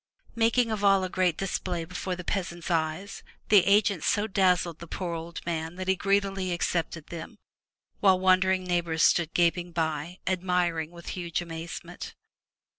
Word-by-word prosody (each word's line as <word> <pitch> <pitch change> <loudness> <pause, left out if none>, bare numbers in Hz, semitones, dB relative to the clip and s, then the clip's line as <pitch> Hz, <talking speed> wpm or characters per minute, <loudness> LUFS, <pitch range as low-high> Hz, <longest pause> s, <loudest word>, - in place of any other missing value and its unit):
Making 230 +1 +2
of 210 -2 -2
all 195 -1 +5
a 185 - -2
great 180 -3 +1
display 180 -3 -2
before 180 +2 -4
the 180 - -7
peasant's 175 -2 -3
eyes, 165 +4 -2 0.3
the 205 -4 +7
agent 200 -4 +3
so 210 0 +2
dazzled 180 -5 +1
the 170 - -9
poor 175 0 -4
old 165 +1 -6
man 165 0 -3
that 185 0 -5
he 190 - +3
greedily 195 -1 0
accepted 170 -2 -2
them, 170 +6 -8 0.6
while 190 -2 +5
wondering 185 0 +3
neigh 175 -1 +1
bors 165 -1 -1
stood 170 -2 +3
gaping 175 0 +2
by, 160 +1 -2
admiring 180 -3 0
with 170 0 -10
huge 170 -3 -3
amazement. 165 -1 -7
180 Hz, 160 wpm, -27 LUFS, 170-190 Hz, 0.6 s, the